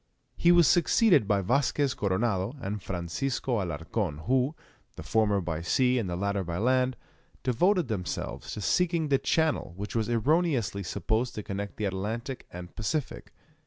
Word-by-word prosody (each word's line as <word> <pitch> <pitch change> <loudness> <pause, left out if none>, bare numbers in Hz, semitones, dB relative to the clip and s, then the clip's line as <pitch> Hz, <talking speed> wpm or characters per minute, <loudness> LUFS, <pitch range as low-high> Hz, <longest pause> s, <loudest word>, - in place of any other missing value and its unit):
He 170 - +4
was 175 -2 +6
succeeded 175 - +4
by 100 -2 +2
Vasquez 135 +5 +1
Coronado 100 +2 0
and 105 -3 -4
Francisco 105 +7 -2
Alarcon, 80 0 -3
who 130 - +1 0.4
the - - -8
former 105 -3 +2
by 85 -2 -3
sea, 125 +8 +2
and 100 -6 -2
the 85 - -2
latter 100 +1 -1
by 85 -1 -4
land 125 +3 +2 0.5
devoted 175 - +2
themselves 100 -6 -4
to 105 - -5
seeking 170 - +1
the 135 -1 +3
channel 160 - 0
which 105 +3 -6
was 115 0 0
erroneously 125 - +1
supposed 110 +6 -1
to 105 - -4
connect 100 +1 -5
the 105 - -1
Atlantic 110 +7 -4
and 90 0 -9
Pacific. 135 +6 -3
110 Hz, 155 wpm, -28 LUFS, 95-135 Hz, 0.5 s, was